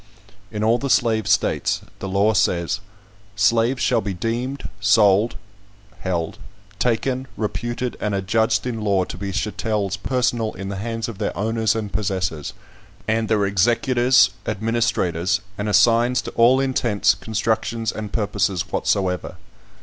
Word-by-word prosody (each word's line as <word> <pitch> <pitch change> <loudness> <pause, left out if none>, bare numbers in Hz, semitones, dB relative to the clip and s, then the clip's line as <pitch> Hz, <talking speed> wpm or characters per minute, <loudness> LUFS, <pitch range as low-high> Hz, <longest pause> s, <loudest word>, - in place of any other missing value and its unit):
In 105 - -4
all 115 +2 +3
the 140 - -3
slave 110 -4 +2
states, - - +1 0.2
the 95 - -5
law 100 +3 +2
says: 90 -3 +1 0.6
"Slaves 115 +4 +2
shall 120 -3 +2
be 100 -3 -4
deemed, 120 +8 -3
sold 105 +2 +4 0.6
[held], 85 -4 -3 0.4
taken, 125 +2 0
reputed, 120 +3 -3
and 105 -1 -1
adjudged 110 +4 +1
in 115 -3 -3
law 100 -3 +2
to 90 - -7
be 100 +2 -5
chattels 105 -1 -2
personal 120 0 0
in 95 +1 -6
the 100 - -4
hands 115 +2 -3
of 110 -4 -8
their 105 - -2
owners 110 +1 +1
and 105 -3 -4
possessors, 90 -7 -2 0.5
and 110 0 +1
their 105 -2 +2
executors, 120 +3 +3 0.2
administrators 105 -4 0 0.2
and 105 +1 -3
assigns, 115 +3 +4
to - - -6
all 120 +3 +4
intents, 115 -7 +2
constructions, 110 +2 -1
and 105 -2 -6
purposes 100 -4 -1
whatsoever. 95 -3 -1
110 Hz, 135 wpm, -22 LUFS, 100-115 Hz, 0.6 s, sold